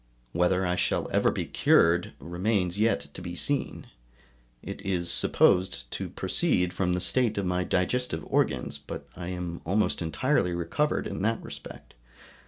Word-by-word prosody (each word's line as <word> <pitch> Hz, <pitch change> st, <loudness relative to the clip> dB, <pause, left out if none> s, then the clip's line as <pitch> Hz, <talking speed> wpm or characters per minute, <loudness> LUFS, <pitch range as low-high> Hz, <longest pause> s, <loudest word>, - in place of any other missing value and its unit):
Whether 90 Hz, +3 st, +2 dB
I 90 Hz, 0 st, 0 dB
shall -, -, 0 dB
ever -, -, +3 dB
be -, -, -2 dB
cured 85 Hz, -1 st, +3 dB
remains 90 Hz, +3 st, -1 dB
yet 70 Hz, -10 st, +1 dB
to -, -, -7 dB
be 90 Hz, -1 st, -6 dB
seen; 140 Hz, +9 st, -2 dB, 0.8 s
it -, -, -7 dB
is 90 Hz, -3 st, 0 dB
supposed 95 Hz, 0 st, +3 dB
to -, -, -4 dB
proceed 90 Hz, 0 st, 0 dB
from 90 Hz, -1 st, 0 dB
the 90 Hz, -, 0 dB
state 115 Hz, +3 st, +1 dB
of 100 Hz, -, 0 dB
my 90 Hz, 0 st, 0 dB
digestive 90 Hz, -2 st, 0 dB
organs, 75 Hz, -, 0 dB
but 70 Hz, -, -8 dB
I 90 Hz, -1 st, -6 dB
am 90 Hz, -2 st, -4 dB
almost 100 Hz, +4 st, +1 dB
entirely 90 Hz, -, +1 dB
recovered 145 Hz, -, 0 dB
in -, -, -4 dB
that 115 Hz, +3 st, +1 dB
respect. -, -, -10 dB
90 Hz, 155 wpm, -28 LUFS, 85-100 Hz, 0.8 s, ever